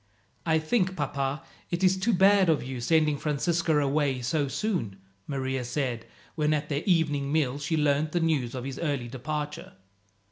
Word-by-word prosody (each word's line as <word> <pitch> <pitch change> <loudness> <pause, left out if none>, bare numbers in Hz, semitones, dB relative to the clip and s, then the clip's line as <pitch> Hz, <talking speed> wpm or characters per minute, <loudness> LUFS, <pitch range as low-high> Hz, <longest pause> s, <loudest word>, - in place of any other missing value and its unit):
"I 160 -1 +4
think, 185 +4 0
papa, 140 -1 -2 0.3
it 175 +2 -2
is 185 0 +5
too 190 +5 +1
bad 195 0 +5
of 155 - +2
you, 130 -1 -5
sending 155 +2 +2
Francisco 160 +2 +1
away 140 -3 +1
so 145 +3 0
soon," 170 - -2 0.3
Maria 130 -2 -2
said, 125 -2 -3 0.3
when 155 -1 +1
at 150 0 -3
their 145 -1 -1
evening 145 -6 +2
meal 145 -3 +1
she 155 +3 -1
learned 150 +1 +2
the 175 - +1
news 145 -7 0
of 125 - -4
his 135 0 -5
early 140 -7 -1
departure. 150 +4 -5
150 Hz, 170 wpm, -27 LUFS, 135-165 Hz, 0.3 s, is